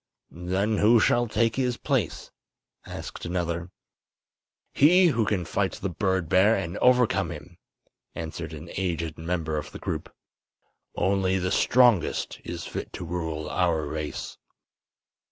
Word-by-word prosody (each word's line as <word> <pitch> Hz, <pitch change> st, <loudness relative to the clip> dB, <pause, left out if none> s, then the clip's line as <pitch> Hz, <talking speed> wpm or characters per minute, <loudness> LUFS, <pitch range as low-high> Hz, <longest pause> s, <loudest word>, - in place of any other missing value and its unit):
"Then 95 Hz, +5 st, -1 dB
who 115 Hz, +3 st, +5 dB
shall 120 Hz, +2 st, +3 dB
take 115 Hz, +1 st, +1 dB
his 125 Hz, -2 st, 0 dB
place?" 130 Hz, -, -2 dB, 0.6 s
asked -, -, -7 dB
another. 85 Hz, 0 st, -2 dB, 1.0 s
"He 180 Hz, +5 st, +6 dB
who 115 Hz, -7 st, +1 dB
can 95 Hz, -5 st, 0 dB
fight 100 Hz, +2 st, -1 dB
the 95 Hz, -1 st, -4 dB
bird 95 Hz, -1 st, 0 dB
bear 95 Hz, +6 st, +4 dB
and 85 Hz, +1 st, -3 dB
overcome 120 Hz, -9 st, +3 dB
him," 85 Hz, +1 st, -10 dB, 0.6 s
answered 80 Hz, 0 st, -5 dB
an 80 Hz, +2 st, -9 dB
aged 85 Hz, -4 st, -2 dB
member 80 Hz, -2 st, -2 dB
of 75 Hz, -, -8 dB
the -, -, -8 dB
group. -, -, -4 dB, 0.8 s
"Only 95 Hz, -1 st, +1 dB
the 90 Hz, 0 st, -1 dB
strongest 120 Hz, -5 st, +3 dB
is -, -, -6 dB
fit -, -, -6 dB
to -, -, -6 dB
rule 80 Hz, -3 st, -4 dB
our 85 Hz, -4 st, +1 dB
race." 75 Hz, +1 st, -5 dB
90 Hz, 135 wpm, -26 LUFS, 85-110 Hz, 1.0 s, He